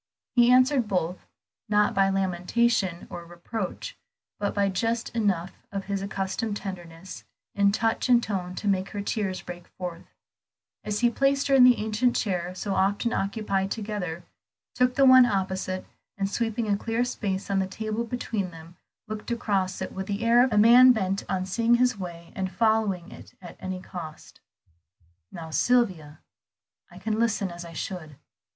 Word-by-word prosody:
He 240 -1 +5
answered 255 -1 +4
both, 180 -2 -2 0.4
not 210 0 +3
by 195 0 +3
lamentation 190 0 0
or 175 - -6
reproach, 180 - -6 0.4
but 205 -1 -2
by 200 -1 +2
just 225 +4 -1
enough 195 -5 0 0.2
of 195 -1 -3
his 200 -1 -2
accustomed 200 +2 -3
tenderness 180 -2 -8 0.3
in 200 0 +3
touch 225 +4 0
and 240 -1 +5
tone 185 -4 -3
to 210 - -4
make 190 -1 +1
her 205 - -3
tears 200 -3 -2
break 175 -1 -9
forth, 175 -2 -6 0.8
as 210 +1 -2
he 240 -1 +4
placed 275 +3 +1
her - - +3
in 265 -2 +7
the 250 -1 +7
ancient 220 +3 0
chair 180 -4 -2
so 195 +1 -3
often 200 +5 +1
occupied 195 -1 -1
together, 200 -6 -4 0.5
took 250 0 +2
the 275 - +5
one 255 -1 +8
opposite, 190 -2 -2 0.3
and 195 0 0
sweeping 225 0 -1
a 205 - +2
clear 230 +4 -1
space 200 -5 -3
on 195 - +2
the 190 - 0
table 215 +3 -3
between 225 -5 -3
them, 165 0 -13 0.3
looked 215 +1 -6
across 200 -5 -1
it - - -6
with 190 0 -5
the 205 +2 -3
air 235 +1 +6
of 260 - +1
a 210 - +1
man 240 +4 +8
bent 195 -3 -1
on 185 -1 -1
seeing 230 +5 +2
his 250 0 +2
way 170 -3 -8
and 190 -1 -3
following 210 -3 +1
it - - -13
at 175 -2 -11
any 185 0 -4
cost. 170 -4 -9 0.9
"Now 160 -1 -8
Sylvia, 180 -9 +1 0.7
I - - -14
can 220 0 -2
listen 215 -5 0
as 175 0 -8
I 170 -1 -10
should." 160 -4 -6
200 Hz, 170 wpm, -26 LUFS, 185-230 Hz, 0.9 s, one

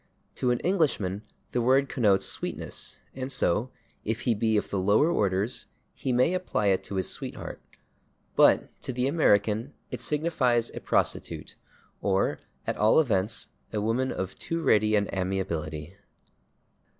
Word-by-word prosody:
To 125 - +1
an 120 - +2
Englishman 140 - +1 0.3
the 125 - 0
word 135 +3 +4
connotes 105 -8 +2
sweetness, - - -4 0.2
and 130 +1 -5
so, 125 -1 +1 0.3
if 110 +1 -2
he 120 - +2
be 110 0 +1
of - - -2
the 100 - 0
lower 105 - +4
orders, 100 - 0 0.3
he 130 - -3
may 125 +8 +3
apply 180 - 0
[Pg130] - - +5
it 95 0 -1
to 100 - -5
his 95 - 0
sweetheart. - - -5 0.7
But - - +4
to - - -3
the 125 +1 0
American 115 - +2 0.2
it 125 - -4
signifies 130 -5 +1
a - - -6
prostitute, - - -1 0.5
or, 95 -1 +1 0.3
at - - -2
all 110 +7 +5
events, 105 -8 0 0.2
a 105 - -1
woman 115 +5 0
of 95 0 -3
too 165 0 -3
ready 110 -3 +4
an 100 -1 +2
amiability. 85 -4 -3
110 Hz, 150 wpm, -27 LUFS, 100-130 Hz, 0.7 s, Pg130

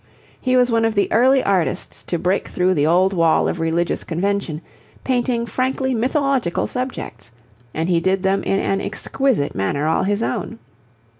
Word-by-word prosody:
He 255 -1 +2
was 250 -1 +3
one 230 0 +2
of 225 0 +1
the 200 - +1
early 260 +3 +4
artists 190 -4 -1
to 175 - -1
break 180 +3 0
through 180 +1 +1
the 145 -3 +1
old 185 +4 +3
wall 165 -3 +3
of 170 - -3
religious 165 +1 -1
convention, 180 -2 -2 0.4
painting 245 -2 0
frankly 260 +2 -1
mythological 260 - 0
subjects, 250 - -5 0.4
and 160 +1 -2
he 175 -2 +2
did 190 +2 0
them 195 +1 +1
in 195 - 0
an 195 0 0
exquisite 265 - -1
manner 100 +10 -1
all 160 - +2
his 205 +3 0
own. 225 - -3
195 Hz, 165 wpm, -20 LUFS, 170-245 Hz, 0.4 s, early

